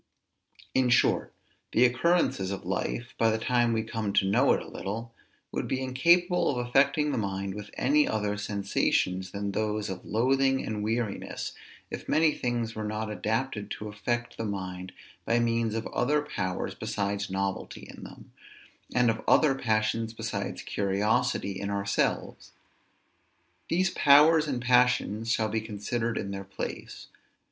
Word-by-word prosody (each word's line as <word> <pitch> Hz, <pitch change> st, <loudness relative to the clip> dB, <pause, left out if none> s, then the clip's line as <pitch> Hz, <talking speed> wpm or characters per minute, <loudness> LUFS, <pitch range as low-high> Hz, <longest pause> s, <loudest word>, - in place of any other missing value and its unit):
In 130 Hz, -1 st, +3 dB
short, 120 Hz, -, +3 dB, 0.4 s
the 125 Hz, -, +5 dB
occurrences 125 Hz, -, +2 dB
of 100 Hz, -1 st, -5 dB
life, -, -, -3 dB
by 115 Hz, -, +4 dB
the 110 Hz, -, +1 dB
time 120 Hz, +1 st, +2 dB
we 110 Hz, -1 st, 0 dB
come 110 Hz, -2 st, -3 dB
to 95 Hz, -, +3 dB
know 120 Hz, +8 st, +3 dB
it -, -, +1 dB
a -, -, -12 dB
little, 115 Hz, +4 st, -5 dB, 0.4 s
would -, -, -3 dB
be 130 Hz, -, -1 dB
incapable 170 Hz, +8 st, +3 dB
of 135 Hz, -, -1 dB
affecting 135 Hz, +5 st, +2 dB
the 125 Hz, -, -1 dB
mind 95 Hz, -1 st, -3 dB
with 105 Hz, 0 st, -8 dB
any 150 Hz, +4 st, +3 dB
other 105 Hz, -1 st, -1 dB
sensations 100 Hz, -2 st, 0 dB
than 100 Hz, +1 st, -3 dB
those 105 Hz, -1 st, -1 dB
of 95 Hz, -, -7 dB
loathing 135 Hz, +4 st, +2 dB
and 105 Hz, -1 st, -3 dB
weariness, 110 Hz, -1 st, -3 dB, 0.4 s
if -, -, -7 dB
many 155 Hz, 0 st, +4 dB
things 120 Hz, -4 st, -2 dB
were 110 Hz, -, -5 dB
not 105 Hz, +1 st, -3 dB
adapted 110 Hz, 0 st, -2 dB
to 105 Hz, -, -5 dB
affect 120 Hz, +3 st, -3 dB
the -, -, -3 dB
mind 95 Hz, -3 st, -5 dB, 0.3 s
by 115 Hz, -, +1 dB
means 115 Hz, -1 st, +1 dB
of 115 Hz, -, -2 dB
other 145 Hz, +4 st, +1 dB
powers 95 Hz, -9 st, -3 dB
besides 100 Hz, -2 st, -2 dB
novelty 95 Hz, 0 st, -3 dB
in -, -, -11 dB
them, -, -, -12 dB, 0.6 s
and 125 Hz, -2 st, +4 dB
of -, -, -5 dB
other 150 Hz, -4 st, +5 dB
passions 110 Hz, -2 st, 0 dB
besides -, -, -4 dB
curiosity 100 Hz, -1 st, 0 dB
in 100 Hz, -, -3 dB
ourselves. 100 Hz, 0 st, -1 dB, 1.2 s
These 185 Hz, +3 st, +2 dB
powers 150 Hz, +2 st, +6 dB
and 125 Hz, -4 st, -2 dB
passions 125 Hz, -3 st, +2 dB
shall 110 Hz, -2 st, +1 dB
be 110 Hz, +1 st, -1 dB
considered 110 Hz, +2 st, -3 dB
in 100 Hz, -, -3 dB
their 100 Hz, 0 st, -5 dB
place. 95 Hz, -1 st, -7 dB
110 Hz, 155 wpm, -28 LUFS, 100-125 Hz, 1.2 s, powers